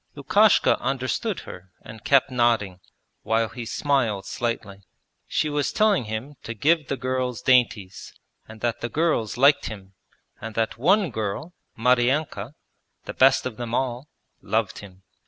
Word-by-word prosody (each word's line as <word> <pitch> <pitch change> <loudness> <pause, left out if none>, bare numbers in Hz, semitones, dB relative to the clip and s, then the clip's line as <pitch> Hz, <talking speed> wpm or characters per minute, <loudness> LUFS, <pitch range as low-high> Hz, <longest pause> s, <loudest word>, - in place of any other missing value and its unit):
Lukashka 200 +10 +3
understood 130 -4 -2
her 95 +1 -11
and 110 0 -12
kept 135 -2 +3
nodding, 115 -7 +1 0.4
while 115 0 0
he 120 +1 -7
smiled 120 -10 0
slightly. 110 -4 -4 0.5
She 155 - 0
was 145 -1 -1
telling 210 - +2
him 110 +7 -6
to 115 - -7
give 155 +5 +2
the 135 - -2
girls 130 -2 -2
dainties, 120 -7 +1 0.4
and 110 0 -13
that 120 -1 -2
the 120 - -3
girls 150 -10 0
liked 140 +3 +4
him, 100 -3 -9 0.5
and 110 0 -7
that 115 -1 -1
one 185 - +3
girl, 110 - -4 0.2
Maryanka 125 0 +1 0.5
the - - -6
best 135 +1 +4
of 125 -4 -5
them 120 -1 -4
all 130 +2 -2 0.3
loved - - -1
him. 95 -2 -14
120 Hz, 145 wpm, -24 LUFS, 110-140 Hz, 0.5 s, liked